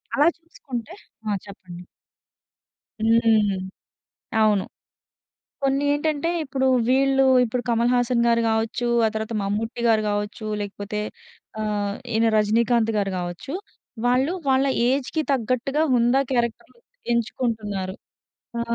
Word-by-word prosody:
అలా 295 +3 +4
చూసుకుంటే 290 -4 -7 0.4
ఆ! - - +1 0.2
చెప్పండి. 180 -3 -11 1.2
హ్మ్. 225 -3 +4 0.9
అవును. 210 -3 +3 1.0
కొన్నేంటంటే 290 +3 +1
ఇప్పుడు 265 -1 -1 0.2
వీళ్ళు 270 +1 +3 0.2
ఇప్పుడు 245 +2 -2
'కమల్ 235 +1 +2
హాసన్' 245 -1 +2
గారు 230 0 +3
కావచ్చు, 225 +2 0 0.2
ఆ - - +3
తర్వాత 220 +1 -3
'మమ్ముట్టి' 225 +4 -2
గారు 220 -1 +4
కావచ్చు 205 +2 -3
లేకపోతే 205 +1 -4 0.6
ఆహ్, 205 -1 -1 0.2
ఈయన 225 +1 +3
'రజినీకాంత్' 225 +2 +2
గారు 195 -1 0
కావచ్చు. 175 - -5 0.5
వాళ్ళు 260 +7 +2 0.2
వాళ్ళ 265 +1 +3 0.2
ఏజ్‌కి 275 +4 0
తగ్గట్టుగా 255 +4 0
హుందా 240 +3 +3
క్యారెక్టర్లు 240 - -2 0.3
ఎంచుకుంటున్నారు. 215 -5 -2 0.6
ఆ! - - -1
235 Hz, 105 wpm, -23 LUFS, 210-265 Hz, 1.2 s, అలా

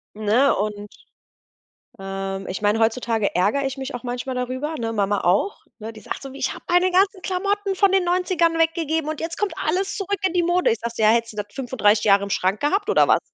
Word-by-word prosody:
Ne? 215 +6 +3
Und 205 0 -3 1.1
ähm, 195 0 -5
ich 190 - -5
meine, 210 +1 +2
heutzutage 225 -1 0
ärgere 205 +10 +1
ich 270 +1 -3
mich 265 0 -5
auch 245 - -7
manchmal 250 +1 -4
darüber, 260 +5 -3
ne? 230 -1 -3
Mama 205 -1 0
auch, 195 - +1 0.2
ne? 225 +1 -7
Die 215 - -12
sagt - - -6
so: 270 - -8
„Ich 275 - -2
habe - - -13
meine 355 +1 +3
ganzen 380 +1 +2
Klamotten 395 +2 -1
von 390 +1 +3
den 385 -1 +3
90ern 350 -2 +1
weggegeben 325 -1 0
und 310 - -4
jetzt 330 +1 -4
kommt 415 -1 -1
alles 375 +5 -1
zurück 400 0 -2
in 365 - -6
die 355 - +2
Mode.“ 350 +1 +2
Ich 225 - -1
sage 235 0 -4
so: 220 - -1
„Ja, 215 - +6
hättest 230 0 +1
du - - -15
das 205 0 -3
35 225 -5 +1
Jahre 200 -1 +4
im 200 - -5
Schrank 195 +1 0
gehabt 395 +8 0
oder - - +4
was?“ - - +4
260 Hz, 225 wpm, -22 LUFS, 215-355 Hz, 1.1 s, Ja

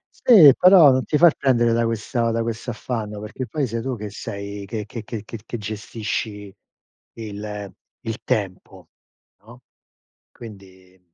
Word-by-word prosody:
Sì, 170 - +7
però 180 -6 +7
non 130 0 0
ti 150 - 0
far 170 -2 +6
prendere 120 -4 +2
da 115 0 +1
questa 115 +1 -1
da 115 - -1
questo 115 +1 -4
affanno, 110 -3 -5
perché 115 +4 -6
poi 140 +3 -2
sei 115 +1 -4
tu 130 0 -3
che 105 -1 -7
sei 100 0 -7
che 105 +1 -5
che 115 0 -8
che 110 -1 -7
che 115 - -8
che 120 - -5
gestisci 105 -1 -5 0.6
il 105 -2 -7 0.3
il 115 0 -5
tempo, 95 -3 -4 0.6
no? - - -16 0.7
Quindi 95 -4 -14
110 Hz, 150 wpm, -22 LUFS, 105-120 Hz, 0.7 s, Sì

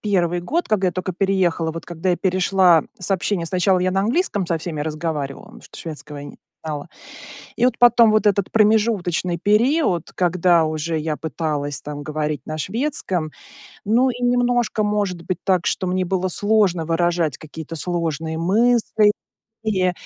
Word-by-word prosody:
1 175 -4 0
год, 320 - -2
когда 195 -4 +2
я 180 - -3
только 185 0 -3
переехала. 180 -4 0
Вот 165 - -7
когда 175 +2 -2
я 175 - +1
перешла 185 -3 +3
с 185 +1 -5
общения, 185 -2 0
сначала 185 +1 +2
я 185 +1 +1
на 195 - +1
английском 210 - 0
со 165 -1 0
всеми 155 -2 -5
разговаривала, 155 -2 -4
потому - - -15
что - - -13
шведского 150 -2 -7
я 140 - -8
не - - -11 0.3
знала. 150 -2 -5 0.7
И 240 - +2
вот 255 - +1
потом 235 -2 +6
вот 215 0 +2
этот 200 -2 +2
промежуточный 205 -5 +2
период, 210 - +1
когда 175 -2 +3
уже 155 +1 -2
я 155 -1 -2
пыталась 150 -2 -3
там 145 0 -7
говорить 150 -2 -3
на 155 - -5
шведском. 190 - -2 0.5
Ну, 245 +5 +3
и 245 0 -6
немножко, 245 -2 +1
может 200 -4 -1
быть, 180 0 -3
так, 185 -3 +1
что 185 - -1
мне 185 0 0
было 185 +1 -1
сложно 200 -4 +1
выражать 170 -2 0
какие-то 160 +1 -9
сложные 160 -2 -3
мысли, 215 +3 +3 0.5
и 185 -4 +1
180 Hz, 165 wpm, -21 LUFS, 160-210 Hz, 0.7 s, потом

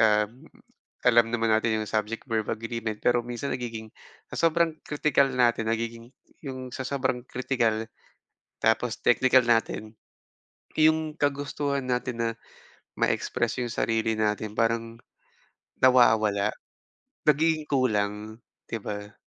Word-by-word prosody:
um, 105 +2 +2 0.6
alam 120 -1 +6
naman 115 -1 +1
natin 110 0 +2
'yong 105 - -4
subject-verb 110 +1 -2
agreement, 115 -1 -4
pero 120 0 +3
minsan 120 +3 -4
nagiging 115 -3 -5 0.4
sa - - -5
sobrang 165 -1 +2
kritikal 145 -2 +2
natin 120 -3 +2
nagiging 115 +2 -3 0.3
'yong 130 -2 -6
sa 130 - -4
sobrang 130 -3 -1
kritikal 115 -4 0 0.8
tapos 110 +1 +2
teknikal 130 +1 +5
natin, 115 -2 0 0.9
yung 155 0 +3
kagustuhan 140 -1 -1
natin 125 -1 -2
na, 115 - +1 0.7
ma-express - - 0
yung 120 -2 -2
sarili 115 0 0
natin 105 0 -1
parang, 115 0 -1 0.8
nawawala, 110 -5 +4 0.7
nagiging 155 +1 +3
kulang 110 -4 0 0.3
'di 115 - -2
ba? 105 0 -6
115 Hz, 110 wpm, -27 LUFS, 110-130 Hz, 0.9 s, alam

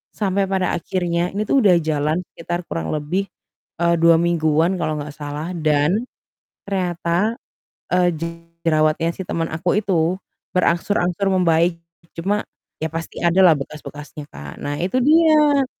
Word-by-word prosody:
Sampai 195 -1 0
pada 190 -2 0
akhirnya 175 0 -1
ini 205 - -1
tuh 275 - +3
udah 190 -3 +6
jalan 155 +1 0
sekitar 175 +1 -4
kurang 80 - -3
lebih, 170 +7 -1 0.6
eee, 170 0 +3
2 165 0 +6
mingguan 165 +1 +2
kalau 155 -2 -1
nggak 145 0 -7
salah, 150 +3 -5
dan 155 +8 +2 0.6
ternyata, 180 +3 0 0.6
eee, 180 -1 +4 0.6
jerawatnya 155 +1 +2
si 190 - -5
teman 165 0 -2
aku 175 +5 +1
itu 175 -3 +1 0.4
berangsur-angsur 180 +2 +1
membaik. 170 -1 +2 0.4
Cuma, 200 +5 -1 0.4
ya - - 0
pasti 165 0 -6
ada 170 +2 +3
lah 165 -3 +7
bekas-bekasnya 150 +1 -8
kan. 70 0 -9
Nah 145 0 -3
itu 190 +8 0
dia, 300 -2 +5
170 Hz, 135 wpm, -21 LUFS, 155-190 Hz, 0.6 s, lah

